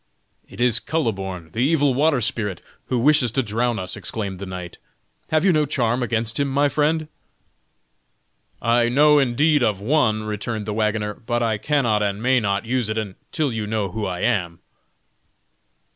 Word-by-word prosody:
"It - - -13
is 120 -2 +3
Kuhleborn, 95 - -3
the 110 - -4
evil 145 +1 +3
water 140 0 +2
spirit, 105 -6 -1 0.3
who 125 - -1
wishes 130 -1 +3
to 135 - +1
drown 115 +2 -1
us!" 90 -3 -5
exclaimed 100 -4 -5
the 100 - -6
knight. 90 -1 -7 0.5
"Have 155 +3 +2
you 190 - +5
no 150 -2 +2
charm, 125 -3 0
against 115 +1 -1
him, 140 - +1
my 140 +1 +2
friend?" 155 +2 0 1.6
"I 120 +1 +3
know 150 +3 +5
indeed 145 +3 +2
of 105 -5 +1
one," 110 -2 +1
returned 110 +1 -4
the 105 - -3
wagoner, 105 -1 -1
"but 120 +2 -2
I 110 -2 0
cannot 120 -8 +1
and 100 -1 -1
may 130 +3 +3
not 100 -1 -1
use 120 -2 -1
it 110 - -2
until 110 - -3
you 110 -2 -3
know 105 -3 -2
who 110 +1 -3
I 90 -1 -4
am." 90 -8 0
115 Hz, 170 wpm, -22 LUFS, 105-135 Hz, 1.6 s, you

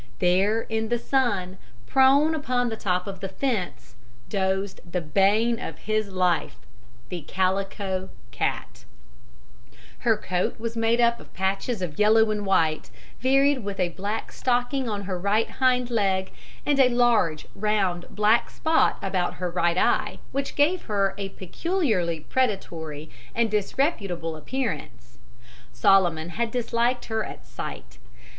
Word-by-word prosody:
There 190 +5 +2
in 220 -1 -3
the 240 - +2
sun, 205 -8 0 0.3
prone 270 - +5
upon 250 -5 0
the 220 - -3
top 180 -4 -1
of 195 -2 -6
the 195 - -4
fence, 195 - -3 0.4
dozed 190 0 -1
the 180 - 0
bane 200 +8 +2
of 160 - -6
his 215 +2 -1
life 180 -2 +1 0.5
the 175 -2 -4
Calico 190 +2 -1 0.2
Cat. - - -3 1.1
Her 225 -2 +2
coat 180 +3 -2
was 230 0 -4
made 225 +1 +2
up 235 0 +3
of - - -15
patches 195 +3 -1
of 155 -4 -5
yellow 215 +1 +5
and 205 -1 -2
white, 160 -5 +1 0.3
varied 270 +1 +3
with 200 -1 -5
a 180 -1 +2
black 200 +5 -4
stocking 245 +1 0
on 205 -2 -3
her 185 -2 -3
right 205 +4 +2
hind 250 -2 +1
leg, 190 -4 +1 0.3
and 290 -1 +2
a 260 -2 +6
large, 240 -11 +2
round, 195 -4 0
black 215 +2 +2
spot 320 0 +2
about 185 -2 -1
her 180 -1 -3
right 175 0 +1
eye, - - +1
which 275 +1 -3
gave 320 +5 +2
her 200 -3 +1
a 195 -1 -3
peculiarly 190 - -1
predatory 160 - -2 0.2
and 230 -2 +1
disreputable 195 - -1
appearance. 150 - -5 0.5
Solomon 170 +4 +3
had 230 +6 -2
disliked 240 +1 0
her 220 -1 -1
at - - -9
sight. - - -8
205 Hz, 140 wpm, -25 LUFS, 180-235 Hz, 1.1 s, a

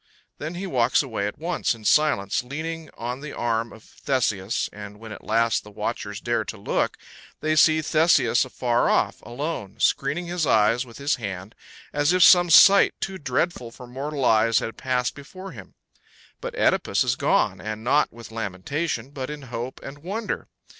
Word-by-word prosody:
Then 155 +4 -5
he 185 +3 -4
walks 125 -6 +2
away 110 -6 -3
at 105 - -6
once 170 -5 -1
in 110 -2 -15
silence, 120 -10 +2
leaning 160 +4 -5
on 120 +2 -4
the 150 0 -8
arm 115 -1 -1
of 110 - -14
Theseus, 110 -7 -1
and 105 0 -10
when 110 0 -10
at 105 - -9
last 115 +1 +1
the 105 - -12
watchers 105 - -4
dare - - -1
to - - -7
look, - - -1 0.4
they 155 0 0
see 155 0 +5
Theseus 160 +2 +3
afar 120 -2 0
off, - - +1
alone, 120 - -5
screening 140 +8 +1
his 175 -3 -2
eyes 115 +4 +3
with 115 - -12
his 140 +1 0
hand, 100 -2 -6 0.4
as 145 +3 +2
if 185 -1 +5
some 175 -1 +7
sight 195 +5 +7
too 190 -1 -4
dreadful 130 -1 -1
for 125 +2 -12
mortal 135 +2 -4
eyes 110 0 +4
had 115 - -2
passed 125 -2 -1
before 185 +7 -10
him; 100 - -12 0.7
but - - -5
OEdipus - - +2
is - - +1
gone, - - +1
and 110 0 -5
not 145 +5 +2
with 115 -1 -12
lamentation, 115 - -3
but 130 -2 -5
in 150 -1 -7
hope 120 +3 -5
and 140 +1 -9
wonder. 205 +7 -4
130 Hz, 175 wpm, -24 LUFS, 115-155 Hz, 0.7 s, some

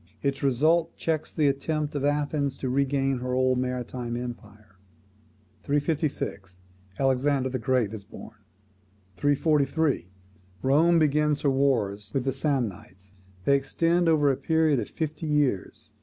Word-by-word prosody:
Its 140 -1 -1
result 155 +5 +2
checks 160 -2 -2
the 155 -3 +1
attempt 150 +2 -1
of 145 -2 -3
Athens 145 -1 0
to 130 - -3
regain 135 -1 +1
her 125 0 -2
old 130 0 +2
maritime 125 -1 -3
empire. 105 -5 -9 0.8
356. 145 - -2 0.4
Alexander 135 0 +1
the 130 0 -3
Great 115 -2 0
is 105 -2 -7
born. - - -12 0.8
343. 145 - +1 0.5
Rome 160 +6 +4
begins 150 -1 +2
her 140 - +2
wars 105 -7 0
with 135 - +1
the 135 0 -1
Samnites: 110 - -3 0.3
they 140 - +5
extend 165 +5 +1
over 145 -3 +4
a 130 - -2
period 160 -4 +2
of 105 - -4
fifty 155 0 -4
years. 145 -9 -1
140 Hz, 130 wpm, -26 LUFS, 125-150 Hz, 0.8 s, they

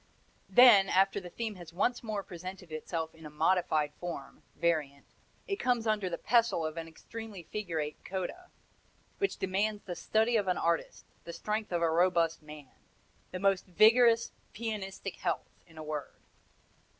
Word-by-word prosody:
Then, 200 -2 +8
after 195 +1 +3
the 180 -2 -9
theme 220 +4 -4
has 175 -2 -10
once 205 +8 0
more 215 -3 -3
presented 180 0 -9
itself 160 +1 -4
in 160 0 -16
a 150 - -7
modified 155 -1 +1
form 170 -6 -7
variant 150 -5 -1 0.4
it 395 - -1
comes 245 - +1
under 210 -4 +1
the 170 - -3
pestle 230 -8 +2
of 155 0 -4
an 165 -1 -5
extremely 210 +3 -9
figurate 165 -7 -4
coda, 195 - -5 0.7
which 395 - 0
demands 205 +3 -1
the 180 -3 -5
study 220 +5 +2
of 205 -3 0
an 180 - +1
artist, 170 0 -1 0.2
the 170 - -8
strength 210 +5 -3
of 170 -1 0
a 165 - +3
robust 170 -1 +2
man 150 -3 -12 0.6
the - - -5
most 195 0 +1
vigorous 230 +5 +5 0.2
pianistic 200 -4 -5
health, - - -2 0.2
in 160 -2 -18
a 155 - -6
word! 150 -2 -5
185 Hz, 160 wpm, -31 LUFS, 165-215 Hz, 0.7 s, Then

